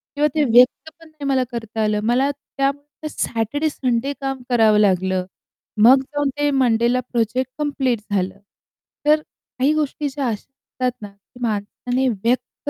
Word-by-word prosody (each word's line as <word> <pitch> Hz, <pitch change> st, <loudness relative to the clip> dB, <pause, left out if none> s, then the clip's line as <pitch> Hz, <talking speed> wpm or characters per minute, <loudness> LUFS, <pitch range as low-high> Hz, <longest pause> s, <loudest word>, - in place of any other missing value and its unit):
किंवा 295 Hz, +1 st, +3 dB
ते 305 Hz, -, +3 dB
व्यक्त 250 Hz, +5 st, +4 dB
पण 330 Hz, -, -15 dB
नाही 310 Hz, -2 st, -9 dB
मला 265 Hz, -2 st, +2 dB
करता 225 Hz, -2 st, -4 dB
आलं. 210 Hz, 0 st, +1 dB
मला 245 Hz, +5 st, +2 dB
त्यामुळे 285 Hz, +2 st, -4 dB
सॅटरडे-संडे 260 Hz, +1 st, -1 dB
काम 270 Hz, -1 st, -3 dB
करावं 220 Hz, -3 st, +4 dB
लागलं. 190 Hz, -2 st, +2 dB, 0.6 s
मग 260 Hz, +4 st, +7 dB
जाऊन 290 Hz, +1 st, -2 dB
ते 290 Hz, 0 st, +2 dB
मंडेला 245 Hz, -2 st, +2 dB
प्रोजेक्ट 240 Hz, +2 st, 0 dB
कंप्लीट 270 Hz, -6 st, 0 dB
झालं. 190 Hz, -1 st, -1 dB, 0.7 s
तर 305 Hz, +1 st, +4 dB
काही 280 Hz, -1 st, -2 dB
गोष्टी 300 Hz, -1 st, -1 dB
ज्या 270 Hz, -1 st, -3 dB
अशा 225 Hz, -, +1 dB
असतात 255 Hz, +2 st, -5 dB
ना, 205 Hz, -, -6 dB
की 200 Hz, +5 st, -21 dB
माणसाने 240 Hz, +4 st, -1 dB
व्यक्त 230 Hz, +3 st, -2 dB
255 Hz, 145 wpm, -21 LUFS, 225-285 Hz, 0.7 s, मग